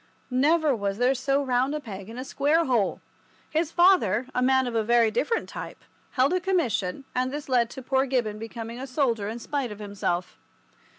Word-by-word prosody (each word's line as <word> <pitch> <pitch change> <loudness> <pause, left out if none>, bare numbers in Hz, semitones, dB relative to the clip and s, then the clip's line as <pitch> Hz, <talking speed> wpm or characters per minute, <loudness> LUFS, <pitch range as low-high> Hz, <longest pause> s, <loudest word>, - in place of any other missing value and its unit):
Never 295 +2 +3
was 200 -2 -2
there 250 +3 +3
so 275 +2 0
round 260 +2 +1
a - - -2
peg 200 -6 -8
in 230 - -9
a 255 - -5
square 300 +5 +2
hole! 235 -6 +1 0.5
His 320 0 0
father, 345 - +4
a 250 - 0
man 260 +1 +3
of 245 - -3
a 225 - +2
very 230 0 +3
different 445 - 0
type, - - -8 0.3
held 270 +4 +3
a 365 - +2
commission, 260 - 0
and 255 +1 0
this 295 +1 -5
led 245 -3 +2
to 265 0 -9
poor 265 +1 +1
Gibbon 235 -5 -1
becoming 225 +1 -7
a 265 - -5
soldier 240 -7 0
in 225 - -5
spite 260 0 -3
of 210 - -7
himself. 200 -4 -3
255 Hz, 195 wpm, -26 LUFS, 225-280 Hz, 0.5 s, father